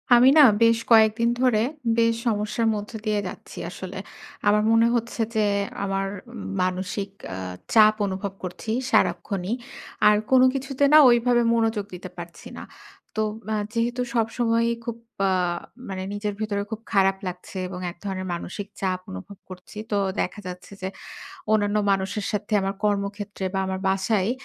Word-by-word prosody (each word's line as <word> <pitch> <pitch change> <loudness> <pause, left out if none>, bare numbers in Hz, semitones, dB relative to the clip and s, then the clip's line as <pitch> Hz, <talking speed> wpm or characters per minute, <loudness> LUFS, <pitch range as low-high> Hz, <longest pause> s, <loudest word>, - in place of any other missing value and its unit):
আমি 245 +2 +7
না - - +10 0.2
বেশ 230 0 +5
কয়েকদিন 225 +1 +5
ধরে 245 -5 +3 0.4
বেশ 230 0 +4
সমস্যার 215 +1 0
মধ্যে 210 +2 -5
দিয়ে 210 -1 +1
যাচ্ছি - - -10
আসলে। - - -7 0.5
আমার 210 +1 +5
মনে 225 0 +5
হচ্ছে 235 0 -2
যে, - - +2 0.4
আমার 195 0 -1 0.5
মানসিক 185 +2 -2 0.3
আ - - -6 0.4
চাপ 215 -1 +7
অনুভব 195 0 -3
করছি 185 +4 -5 0.2
সারাক্ষণই। 195 0 +1 0.5
আর 210 - +7 0.2
কোন 260 -1 +7
কিছুতে 270 0 -2
না - - +10
ঐভাবে 240 0 +4
মনোযোগ 225 -3 +1
দিতে 180 +1 -7
পারছি 170 -1 -9
না। - - -7 0.5
তো - - +2 0.3
আ - - +1 0.2
যেহেতু 240 +1 0
সবসময়ই 230 0 +1
খুব 235 -1 -4 0.3
আ - - +2 0.6
মানে 190 -1 -4
নিজের 205 0 -2
ভেতরে 205 -2 -1
খুব 220 0 -4
খারাপ 195 -1 +4
লাগছে 180 +2 -7
এবং 180 0 -7
এক 170 - -18
ধরনের 185 -1 -3
মানসিক 190 +4 -5
চাপ 185 -1 0
অনুভব 95 - -9
করছি। 185 +3 -11
তো 205 - +2 0.2
দেখা - - -3
যাচ্ছে 180 +1 -9
যে 185 - -2 0.7
অন্যান্য 205 -1 +2 0.2
মানুষের 195 +2 -1
সাথে 210 +1 -3
আমার 195 0 -2
কর্মক্ষেত্রে 200 -1 -2
বা, - - +1
আমার 190 0 -3
বাসায় 190 +1 +1
205 Hz, 150 wpm, -24 LUFS, 190-230 Hz, 0.7 s, না